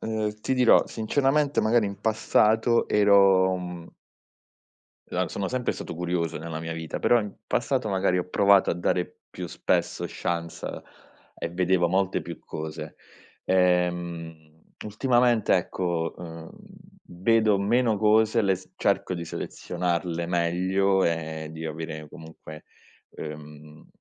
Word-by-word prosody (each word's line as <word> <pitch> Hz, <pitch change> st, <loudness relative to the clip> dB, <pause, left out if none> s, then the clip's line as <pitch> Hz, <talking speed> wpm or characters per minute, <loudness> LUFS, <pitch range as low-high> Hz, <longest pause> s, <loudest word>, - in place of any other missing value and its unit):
uhm, 110 Hz, -1 st, -3 dB
ti -, -, -1 dB
dirò 125 Hz, -2 st, +5 dB
sinceramente, 140 Hz, +5 st, +1 dB
magari 110 Hz, 0 st, +3 dB
in 100 Hz, 0 st, -6 dB
passato 110 Hz, +1 st, +2 dB
ero, 100 Hz, -2 st, +5 dB
mhmm 90 Hz, -2 st, -8 dB, 1.2 s
la -, -, -1 dB
sono 95 Hz, -1 st, -3 dB
sempre 125 Hz, -1 st, -1 dB
stato -, -, -7 dB
curioso 85 Hz, -1 st, -2 dB
nella 80 Hz, 0 st, -6 dB
mia 80 Hz, 0 st, -4 dB
vita, 80 Hz, -1 st, -5 dB
però 120 Hz, -1 st, +4 dB
in 105 Hz, -1 st, -5 dB, 0.2 s
passato 125 Hz, -6 st, 0 dB
magari 95 Hz, -1 st, +1 dB
ho 90 Hz, 0 st, -2 dB
provato 100 Hz, +1 st, +4 dB
a -, -, 0 dB
dare 90 Hz, +1 st, -2 dB
più -, -, -7 dB
spesso -, -, -1 dB
chance 85 Hz, -1 st, -4 dB, 0.7 s
e -, -, -4 dB
vedevo 90 Hz, 0 st, +2 dB
molte 95 Hz, +1 st, 0 dB
più -, -, -8 dB
cose. 80 Hz, 0 st, -7 dB, 0.5 s
Ehm, 85 Hz, -3 st, -1 dB, 0.2 s
ultimamente 120 Hz, 0 st, +2 dB
ecco, 85 Hz, -2 st, -2 dB
uhm, 85 Hz, -2 st, -9 dB, 0.7 s
vedo 110 Hz, -2 st, +4 dB
meno 110 Hz, +2 st, +2 dB
cose, 110 Hz, +2 st, +3 dB
le 100 Hz, -3 st, +2 dB
s 95 Hz, 0 st, -13 dB
cerco -, -, 0 dB
di 85 Hz, -2 st, -4 dB
selezionarle 85 Hz, 0 st, -3 dB
meglio 95 Hz, +3 st, +1 dB
e 80 Hz, -2 st, -2 dB
di 80 Hz, 0 st, -6 dB
avere 80 Hz, -1 st, -6 dB
comunque, 80 Hz, -1 st, -12 dB, 0.5 s
uhm, 75 Hz, 0 st, -10 dB
90 Hz, 125 wpm, -26 LUFS, 85-105 Hz, 1.2 s, dirò